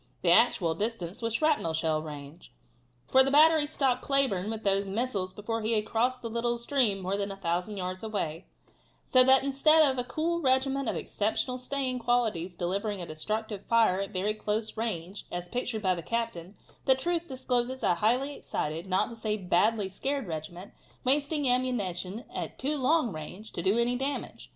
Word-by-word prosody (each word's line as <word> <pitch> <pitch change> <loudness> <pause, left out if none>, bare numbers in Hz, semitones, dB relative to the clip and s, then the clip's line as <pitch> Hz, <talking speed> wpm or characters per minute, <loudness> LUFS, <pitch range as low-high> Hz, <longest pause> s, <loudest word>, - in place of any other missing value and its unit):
The 170 - +4
actual 175 -5 +4
distance 205 +1 -3
was 230 -1 -1
shrapnel 300 - +1
shell 160 -1 0
range, 150 +1 -10 0.6
for 265 - +6
the 265 - +3
battery 305 +1 +6
stopped 265 -4 +1
Cleburne 260 -9 +1
with 220 0 -5
those 195 0 +1
missiles 200 -3 -2
before 225 +4 -4
he 220 +2 0
had 210 -1 +1
crossed 245 +3 0
the - - -2
little 235 +1 -1
stream 235 -4 +1
more 190 +2 -1
than 200 0 -2
1,000 195 +1 -2
yards 185 0 -4
away, 195 -6 -3 0.6
so 255 -1 +5
that 265 +1 +6
instead 305 +3 +5
of 265 -2 0
a - - 0
cool 325 +7 -1
regiment 270 -1 +2
of - - -2
exceptional 235 +4 -2
staying 255 -1 -2
qualities 220 -8 0
delivering 195 +4 -2
a 175 - -5
destructive 210 +6 -3
fire 225 -5 +3
at 195 - -4
very 205 +2 -1
close 215 +1 -2
range, 200 -4 -4
as 175 0 -4
pictured 240 -1 -3
by 185 -1 +3
the 170 - -5
captain, 215 -3 -3 0.3
the 265 - +5
truth 340 +5 -2
discloses 255 -1 -2
a - - +4
highly 245 +10 +1
excited, 160 - -4
not 185 0 +1
to 235 - -8
say 220 -2 -2
a - - -1
badly 200 +3 +2
scared 270 +7 -3
regiment, 170 +3 -7 0.3
wasting 285 +2 +1
ammunition 235 -4 -1
at - - -5
too 285 +4 0
long 280 -3 +2
range 180 +8 -8
to - - -3
do 195 +5 +2
any 235 +1 +2
damage. 270 +3 -4
225 Hz, 180 wpm, -29 LUFS, 185-260 Hz, 0.6 s, for